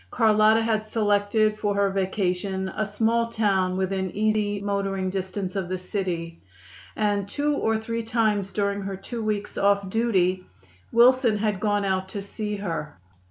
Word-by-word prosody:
Carlotta 220 -1 +4
had 220 -1 0
selected 215 0 +2
for 205 -1 0
her 200 -1 +2
vacation 190 0 -1
a 215 - 0
small 225 +3 +1
town 195 -5 +1
within 190 0 -1
easy 210 -1 +1
motoring 195 -2 -1
distance 190 0 -4
of 190 -3 -2
the 185 - -1
city, 180 -3 -4 0.5
and 205 -2 0
two 295 +5 0
or 225 -5 +1
three 230 +1 -3
times 220 -4 0
during 200 -1 -1
her 195 -1 -4
two 230 +4 -6
weeks 210 -1 -2
off 200 0 +2
duty 190 -5 +1 0.5
Wilson 240 -1 +5
had 210 -2 -1
gone 205 -1 +1
out 190 -1 -1
to 200 - -5
see 210 +1 -4
her. 165 - -4
205 Hz, 155 wpm, -25 LUFS, 190-215 Hz, 0.5 s, Wilson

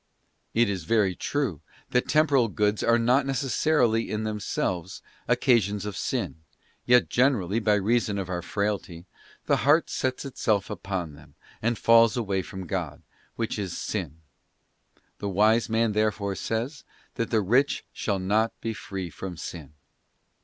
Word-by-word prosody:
'* - - -46
It 120 0 +4
is 95 -5 -3
very 105 -1 +2
true 130 - -2 0.3
that 125 - +1
temporal 145 -6 +3
goods 105 0 0
are 115 0 +4
not 125 +4 +3
necessarily, 135 -3 +1
in 110 0 -2
themselves, 95 -4 -3 0.3
occa 120 -3 +4
sions 100 0 -4
of 105 -2 -4
sin, - - -2 0.5
yet 125 0 +5
generally, 115 -6 +2
by 105 -2 +3
reason 105 +1 +1
of 95 -2 -3
our 90 -1 -3
frailty, 100 -3 -3 0.4
the - - +3
heart 145 +7 +3
sets 130 +1 -2
itself 110 -7 -1
upon 95 -5 -4
them, 75 0 -17 0.3
and 115 +1 0
falls 115 0 +5
away 100 -5 0
from 95 +1 -8
God, 85 -5 -4 0.3
which 115 -2 -2
is 95 -4 -4
sin. 85 -8 -4 1.0
The 100 - -3
wise 110 +5 +3
man 115 0 +2
therefore 105 -1 0
says, 120 +8 -3 0.3
that 115 - -2
the 110 -2 +2
rich 125 +9 +2
shall 100 -2 -1
not 105 +4 0
be 115 0 -3
free 95 -4 -6
from 90 -1 -7
sin. 75 -3 -8
105 Hz, 155 wpm, -26 LUFS, 95-120 Hz, 1.0 s, yet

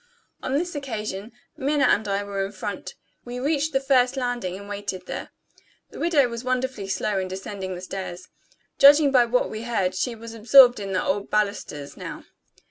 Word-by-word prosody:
On 260 - -3
this 350 +3 -2
occasion, 220 -7 -5 0.2
Minna 285 +1 +1
and 220 -4 +3
I 200 0 0
were 200 -1 -3
in 195 - -4
front. 200 0 -6 0.3
We 245 0 -6
reached 295 +3 0
the 270 - +2
first 270 -1 +2
landing, 245 -8 -2
and 200 +1 -10
waited 200 -3 -5
there. - - -6 0.6
The - - -10
widow 315 -6 +3
was 235 0 -6
wonderfully 255 -5 -2
slow 195 +1 -1
in 185 - -2
descending 190 0 -5
the 180 - -8
stairs. 185 -1 -6 0.5
Judging 285 +1 +8
by 250 -3 +5
what 245 +2 +1
we 215 - -5
heard, 210 -6 0
she 235 +6 -2
was 230 0 -9
absorbed 240 +2 +7
in 195 -1 -4
the 185 - +1
old 200 +1 -1
balusters 200 -9 -2
now. - - -7
220 Hz, 185 wpm, -24 LUFS, 195-260 Hz, 0.6 s, Judging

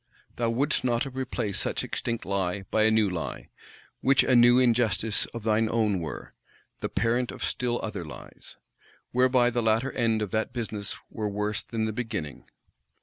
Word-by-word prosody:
Thou 115 -1 +1
wouldst 130 +5 +1
not 120 +1 +1
replace 130 -6 -3
such - - -1
extinct 115 -1 -3
Lie 95 0 -1
by 110 0 +3
a - - +5
new 110 -1 +3
Lie, 90 -4 -5 0.5
which 135 0 +4
a 130 - +3
new 120 +1 +7
Injustice 115 -4 +2
of 115 -2 -8
thy 110 -1 +2
own 110 -4 +1
were; 80 -2 -6 0.5
the - - -3
parent 120 +1 0
of - - -7
still 120 -1 -1
other 105 -5 -4
Lies? 75 - -11 0.5
Whereby 125 -1 +4
the 120 0 0
latter 115 +4 +2
end 115 -3 +1
of 105 - -5
that 110 0 -1
business 110 -4 -4
were 105 -1 -2
worse 105 +1 -2
than 110 -2 -3
the 110 - -2
beginning. 105 - -5
115 Hz, 170 wpm, -27 LUFS, 105-120 Hz, 0.5 s, new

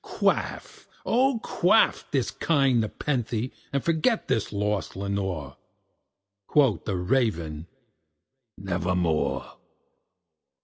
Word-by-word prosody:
Quaff, - - -2 0.2
oh 255 +1 +2
quaff - - +3
this - - 0
kind 135 -7 +2
nepenthé, 120 0 -2 0.2
and 140 -1 -1
forget 170 +8 +1
this 110 - 0
lost 105 -1 -2
Lenore!" 95 -8 -3 0.9
Quoth 130 - +3
the 100 -3 -1
Raven, 90 - 0 0.9
"Nevermore." 90 -3 -1
105 Hz, 85 wpm, -26 LUFS, 90-135 Hz, 0.9 s, quaff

